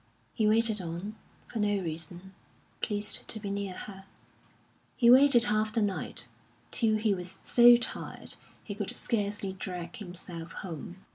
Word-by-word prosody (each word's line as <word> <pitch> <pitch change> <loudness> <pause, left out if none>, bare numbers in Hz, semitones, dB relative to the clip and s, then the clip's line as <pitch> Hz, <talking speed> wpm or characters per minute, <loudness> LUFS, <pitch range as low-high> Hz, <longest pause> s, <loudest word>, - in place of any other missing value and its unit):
He 215 - +1
waited 220 -1 +3
on, 175 +5 -5 0.3
for 225 - -6
no 205 -1 +2
reason 175 +2 -6 0.5
pleased 210 0 -2
to 220 - -3
be 205 -2 -5
near 200 -1 -3
her. 195 -1 -8 0.9
He 240 -2 +6
waited 260 -2 +8
half 215 -1 +1
the 220 0 +1
night, 200 -2 -1 0.4
till 220 -2 +3
he 215 -1 +2
was 180 -1 -4
so 240 0 +7
tired 240 - -3 0.3
he 205 - -5
could 205 -1 -4
scarcely 205 -3 -2
drag 180 -2 -6
himself 175 -4 -8
home. 175 +2 -8
205 Hz, 145 wpm, -29 LUFS, 185-220 Hz, 0.9 s, waited